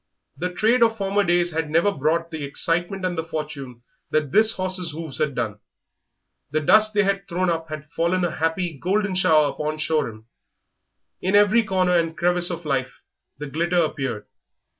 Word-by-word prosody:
The 180 +2 -3
trade 225 +7 +2
of 225 -1 +4
former 200 0 +1
days 175 -1 +2
had 160 -1 -2
never 170 +6 +3
brought 165 +1 -1
the 160 -2 -5
excitement 175 +6 -1
and 180 -1 -1
the 160 - -2
fortune 150 -6 -6 0.3
that 150 -3 0
this 220 +4 +5
horse's 185 -3 -2
hoofs 160 -3 -3
had 150 -3 0
done. 110 -4 -3 0.9
The 155 +2 0
dust 215 +7 +4
they 205 - +4
had 195 0 -1
thrown 180 0 0
up 165 -1 -3
had 155 -1 -6
fallen 175 +2 0
a 175 - -1
happy, 165 +1 -1
golden 200 +3 0
shower 155 -5 +4
upon 155 0 -3
Shoreham. 140 -9 -2 1.0
In 190 +2 +1
every 205 +3 +5
corner 185 -3 +1
and 165 -1 -3
crevice 175 0 +2
of 170 -2 -5
life 135 -3 -2 0.4
the 150 - -6
glitter 170 +5 -1
appeared. 135 -10 -1
170 Hz, 175 wpm, -23 LUFS, 155-185 Hz, 1.0 s, this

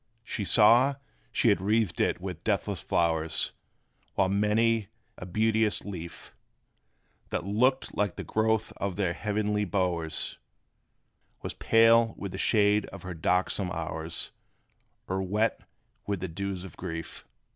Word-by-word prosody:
They 100 - -2
saw 120 +7 +6 0.4
she - - +3
had 90 - +3
wreathed 105 -1 +1
it - - +1
with 90 -2 -6
deathless 100 -3 -1
flowers; 80 -2 0 0.6
While 95 -1 +2
many 105 +2 +2 0.3
a 90 - -8
beauteous 110 +2 +1
leaf, 85 -4 -8 0.9
That - - -2
looked 125 +7 +1
like 105 -3 0
the - - -5
growth 110 0 0
of 100 -2 -2
their 95 -4 0
heavenly 105 +2 -1
bowers, 90 -5 -1 1.0
Was - - -4
pale 115 0 +4
with 100 - -5
the 95 - -6
shade 105 -1 +3
of 100 - -10
her 95 -1 -5
darksome 90 +3 0
hours, 80 0 -3 0.8
Or 95 +1 -1
wet 105 +4 0 0.5
with 100 -3 -2
the 95 - -2
dews 95 +2 -4
of 95 -5 -11
grief. 80 -2 -6
100 Hz, 135 wpm, -28 LUFS, 90-110 Hz, 1.0 s, saw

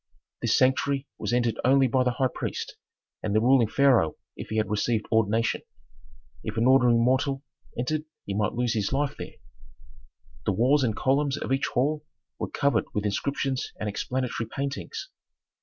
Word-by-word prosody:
This - - +2
sanctuary 135 +1 +2
was - - -2
entered 120 -2 +1
only 135 +1 +5
by 130 +1 +2
the 125 -1 +1
high 130 0 +1
priest, - - -4 0.5
and 105 -1 -2
the - - +5
ruling 125 0 +4
pharaoh 115 - +3 0.2
if - - -7
he 110 - -2
had 110 -1 0
received 105 +1 0
ordination. 110 +1 +2 0.8
If 110 +1 -5
an 115 - +2
ordinary 125 -2 +5
mortal 130 +3 +1 0.3
entered 155 +6 -1 0.2
he 100 - -3
might 105 +1 0
lose 120 -1 0
his 105 -4 -1
life 140 +1 0
there. - - -7 1.1
The - - +3
walls 130 +8 +3
and 110 -4 0
columns 140 +1 +1
of 135 - -2
each 135 - +1
hall 150 +4 0 0.4
were - - -3
covered 140 -1 +1
with 105 0 -1
inscriptions 135 +5 -1
and 110 - -3
explanatory 120 +2 -2
paintings. 140 - -4
125 Hz, 165 wpm, -26 LUFS, 110-135 Hz, 1.1 s, only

